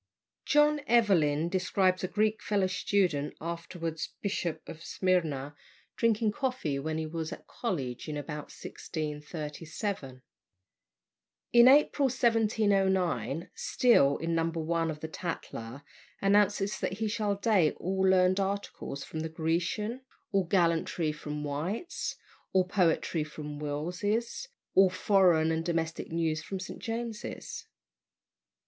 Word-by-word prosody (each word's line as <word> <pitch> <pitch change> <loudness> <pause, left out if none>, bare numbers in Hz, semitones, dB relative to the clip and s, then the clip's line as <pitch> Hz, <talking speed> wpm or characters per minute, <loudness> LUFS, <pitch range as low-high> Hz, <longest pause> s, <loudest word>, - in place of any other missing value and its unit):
John 295 0 +4
Evelyn 170 -10 +3
describes 185 0 +1
a - - +1
Greek 215 +2 +1
fellow 205 -2 +1
student, 185 -5 0
afterwards 165 -1 -5
Bishop 175 -6 -2
of 165 +1 -9
Smyrna, 155 -7 0 0.4
drinking 225 -2 +2
coffee 250 - -2
when 155 +2 -2
he 160 - -2
was 160 +1 -4
at - - -8
college 145 - -4
in 150 - -3
about 150 0 -5
1637. 150 - -5 1.3
In 240 +1 +8
April 285 0 +5
1709 195 - +1
Steele, 145 - +3
in 165 +1 -2
No. 165 0 +2
1 165 0 -1
of 150 -1 -5
the 160 - -3
Tatler, 145 -6 -6 0.4
announces 205 0 +2
that - - -1
he 215 +3 -2
shall 210 -1 0
date 200 -6 +3
all 190 +2 -2
learned 185 0 +4
articles 195 -7 -3
from 160 - -6
the 160 0 -3
"Grecian," 170 +9 -1 0.3
all 195 -2 +2
gallantry 170 -2 +1
from 150 0 -5
"White's," 160 - -3 0.4
all 190 -1 +5
poetry 180 -3 +1
from 150 -1 -7
"Wills's," 180 - -2 0.3
all 190 0 +6
foreign 180 -4 +3
and 160 0 0
domestic 165 -2 -2
news 160 -1 0
from 190 +3 -5
"St. 185 - -7
James's." 225 -1 -5
175 Hz, 120 wpm, -30 LUFS, 155-205 Hz, 1.3 s, In